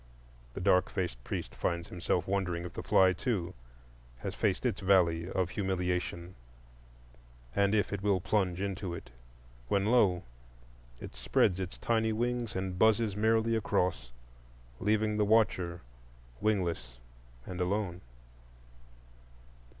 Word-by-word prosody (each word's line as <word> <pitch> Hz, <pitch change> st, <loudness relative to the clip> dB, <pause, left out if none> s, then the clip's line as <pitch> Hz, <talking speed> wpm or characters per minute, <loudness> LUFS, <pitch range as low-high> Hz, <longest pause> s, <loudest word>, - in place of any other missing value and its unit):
The -, -, -4 dB
dark 90 Hz, -1 st, +3 dB
faced 85 Hz, -11 st, -3 dB
priest -, -, -4 dB
finds 85 Hz, -1 st, -2 dB
himself 90 Hz, 0 st, -1 dB
wondering 90 Hz, -3 st, -1 dB
if 90 Hz, -, -7 dB
the -, -, -5 dB
fly 95 Hz, -1 st, +4 dB
too 95 Hz, -3 st, -2 dB, 0.7 s
has -, -, -4 dB
faced 100 Hz, +3 st, 0 dB
its 115 Hz, -6 st, 0 dB
Valley 90 Hz, -3 st, +3 dB
of 95 Hz, -2 st, -1 dB
Humiliation, 90 Hz, -2 st, -2 dB, 1.2 s
and 100 Hz, +1 st, +3 dB
if 105 Hz, -1 st, +1 dB
it 100 Hz, -, -3 dB
will 100 Hz, -2 st, +2 dB
plunge 90 Hz, -2 st, 0 dB
into 95 Hz, -2 st, -3 dB
it,—when -, -, -5 dB
lo! 105 Hz, -6 st, +3 dB, 0.8 s
it -, -, -9 dB
spreads 95 Hz, -1 st, +2 dB
its 95 Hz, -1 st, -5 dB
tiny 110 Hz, -1 st, +1 dB
wings 120 Hz, 0 st, -1 dB
and 95 Hz, -1 st, -3 dB
buzzes 110 Hz, -2 st, +3 dB
merrily 110 Hz, +2 st, +2 dB
across, 90 Hz, -, 0 dB, 0.7 s
leaving 105 Hz, 0 st, +1 dB
the 105 Hz, -, +3 dB
watcher 100 Hz, -5 st, +2 dB, 0.6 s
wingless 85 Hz, -, -1 dB, 0.5 s
and 90 Hz, 0 st, -5 dB
alone. 90 Hz, -1 st, -1 dB
95 Hz, 120 wpm, -31 LUFS, 85-105 Hz, 1.2 s, fly